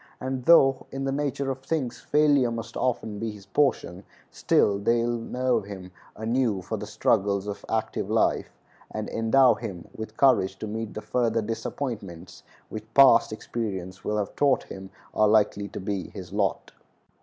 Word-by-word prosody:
And 130 -1 -4
though, 135 -6 +5
in 135 0 -4
the 135 - -1
nature 140 -1 -1
of 130 - -5
things, 135 -4 -3
failure 145 -4 +3
must 115 0 -6
often 110 -4 -2
be 115 - -2
his 105 -2 -10
portion, 100 -6 0 0.3
still 100 -1 +2
they 115 +3 +2
will 120 0 -1
nerve 125 -1 -1
him 95 -2 -9 0.2
anew 110 -3 0
for 110 - -4
the 105 0 -6
struggles 100 -2 +1
of 105 -1 -6
active 110 -1 -2
life, - - +1 0.4
and 110 -1 -5
endow 125 +3 +4
him 90 -3 -7
with 110 0 -8
courage 100 -8 +3
to - - -6
meet 110 +1 -5
the 105 - -4
further 115 -2 0
disappointments 105 -6 -5 0.3
which 110 0 -8
past 130 -5 +7
experience 95 -5 -5
will 105 - -1
have 105 -2 -3
taught 140 -2 +2
him 95 0 -9 0.2
are 110 - +3
likely 105 -1 +2
to - - -7
be 95 -1 -3
his 95 0 -10
lot. 100 -2 -1
110 Hz, 165 wpm, -26 LUFS, 100-125 Hz, 0.4 s, past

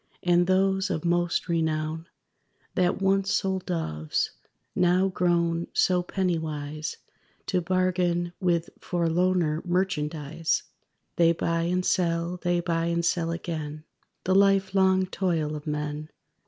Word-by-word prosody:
And 175 0 +3
those, 190 +1 +2
of 165 -3 -2
most 175 0 +1
renown, 160 -1 -1 0.7
That 180 0 +1
once 195 0 +2
sold 190 -2 0
doves, 80 - -1 0.4
now 180 +2 +3
grown 170 -2 +1
so 180 -1 +3
pennywise 155 -5 -3 0.5
To 180 -2 0
bargain 175 -1 0
with 170 -2 0
forlorner 170 -2 +1
merchandise, 165 -3 -1 0.5
They 170 -1 +5
buy 165 0 -1
and 180 +1 0
sell, 170 0 0
they 175 -1 +1
buy 165 -1 0
and 170 0 0
sell 170 -1 +1
again, 155 -3 -4 0.4
The 185 - +1
life 195 -1 +4
long 190 -1 +4
toil 170 -5 -1
of 150 +1 -8
men. 150 0 -3
175 Hz, 120 wpm, -26 LUFS, 160-185 Hz, 0.7 s, They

